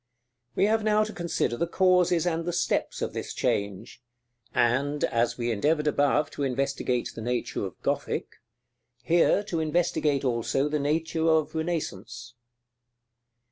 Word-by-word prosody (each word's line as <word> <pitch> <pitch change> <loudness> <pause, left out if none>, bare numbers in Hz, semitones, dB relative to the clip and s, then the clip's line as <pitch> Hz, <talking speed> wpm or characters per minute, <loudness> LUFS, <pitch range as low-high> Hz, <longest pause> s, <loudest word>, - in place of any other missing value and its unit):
We - - +3
have 220 +1 +2
now 215 0 +3
to 215 - -5
consider 170 -8 -1
the 170 - 0
causes 180 -2 +3
and 165 -1 0
the 175 - -2
steps - - -1
of - - -3
this - - -5
change; 100 +3 -2 0.5
and, 135 +5 +1
as 115 +1 +1
we 120 -1 -1
endeavored 150 +8 +1
above 145 0 +2
to - - -7
investigate 135 -2 -1
the 115 - -7
nature 120 -1 -2
of 90 - -13
Gothic, - - -2 0.7
here 175 +4 +3
to 175 -5 -3
investigate 155 -3 +1
also 125 +3 0
the 150 0 -1
nature 160 +3 0
of 155 -1 +2
Renaissance. 125 - -4
150 Hz, 140 wpm, -27 LUFS, 120-170 Hz, 0.7 s, We